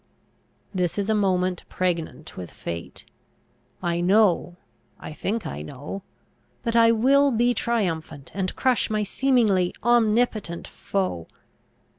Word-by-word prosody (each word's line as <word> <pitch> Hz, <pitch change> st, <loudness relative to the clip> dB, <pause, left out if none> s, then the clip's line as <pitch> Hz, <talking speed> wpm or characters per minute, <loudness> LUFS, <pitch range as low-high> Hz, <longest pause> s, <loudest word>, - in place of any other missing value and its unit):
This 180 Hz, -2 st, -1 dB
is 205 Hz, +1 st, 0 dB
a -, -, +4 dB
moment 185 Hz, -3 st, +1 dB
pregnant 165 Hz, -4 st, -2 dB
with 90 Hz, -2 st, -7 dB
fate. 85 Hz, 0 st, -7 dB, 0.8 s
I 170 Hz, 0 st, 0 dB
know 185 Hz, -2 st, +3 dB, 0.4 s
I -, -, -8 dB
think 210 Hz, +5 st, -3 dB
I 75 Hz, -, -5 dB
know 140 Hz, -, -7 dB, 0.6 s
that 230 Hz, -2 st, -1 dB
I 230 Hz, -1 st, +6 dB
will 275 Hz, +5 st, +4 dB
be 240 Hz, 0 st, +2 dB
triumphant, 165 Hz, -, -2 dB
and 190 Hz, -1 st, -2 dB
crush 255 Hz, -3 st, +2 dB
my 215 Hz, -1 st, 0 dB
seemingly 210 Hz, -6 st, +2 dB
omnipotent 225 Hz, -6 st, +2 dB
foe. 185 Hz, -, -3 dB
195 Hz, 120 wpm, -24 LUFS, 170-230 Hz, 0.8 s, I